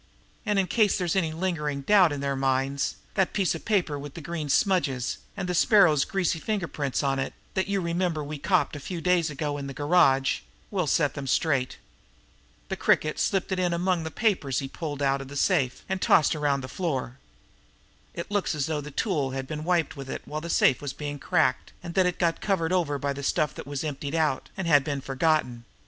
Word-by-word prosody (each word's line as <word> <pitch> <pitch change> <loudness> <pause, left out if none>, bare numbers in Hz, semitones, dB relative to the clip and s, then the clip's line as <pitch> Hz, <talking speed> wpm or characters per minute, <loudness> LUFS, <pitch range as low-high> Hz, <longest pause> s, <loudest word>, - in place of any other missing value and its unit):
And 210 -1 +2
in 195 - +3
case 210 +1 +2
there's 180 -2 -1
any 170 -5 +1
lingering 155 -4 -2
doubt 185 +1 +5
in 145 -1 -3
their 140 0 -1
minds, 135 +1 0 0.2
that 190 -2 +1
piece 195 -4 +1
of 165 - -8
paper 180 -9 +1
with 145 0 -9
the - - -6
grease 155 -2 -3
smudges 140 - +1 0.2
and 180 - -3
the 180 - -1
Sparrow's 175 - +5
greasy 180 -4 0
finger 200 0 -2
prints 145 -3 -2
on 135 -1 +1
it, 135 - -3 0.2
that 190 -1 0
you 200 -1 0
remember 170 -2 -1
we 145 0 -6
copped 185 -1 +1
a - - -5
few 175 +5 -5
days 175 -1 +2
ago 145 0 -3
in 140 - -5
the 135 - -7
garage, 145 -4 +3 0.3
will 185 -6 0
set 145 0 +2
them 140 -2 -6
straight. 135 -2 +1 0.9
The - - -1
Cricket 155 0 +1
slipped 195 -1 0
it 190 - 0
in 180 -1 +1
among 175 0 0
the 160 - -4
papers 160 - 0
he 135 - -1
pulled 145 0 -5
out 135 0 +2
of 135 - -8
the 140 - -9
safe 140 -5 +1
and 190 0 -2
tossed 160 -1 +4
around 145 -2 +1
on 140 - -2
the 130 - -6
floor. 130 -5 -3 1.0
It 170 +3 -6
looks 205 -5 0
as 145 -3 0
though 155 -1 -1
a 145 0 -7
tool 145 - -1
had 135 - -3
been 155 +2 -5
wiped 170 -2 +1
with 135 -1 -8
it - - -5
while 155 +1 -5
the 170 - -6
safe 130 - +3
was 145 -2 -4
being 145 -1 -5
cracked, 130 -1 +1
and 170 - -6
that 185 -1 +3
it 180 - -2
got 170 -2 0
covered 185 -4 0
over 160 -6 +1
by 140 0 -2
the 140 - -6
stuff 145 +1 0
that - - -9
was 145 0 -3
emptied 145 0 -4
out, 155 -5 0
and 190 - -3
had 145 -4 +5
been 140 -1 -3
forgotten. 135 -3 0
155 Hz, 225 wpm, -26 LUFS, 140-180 Hz, 1.0 s, doubt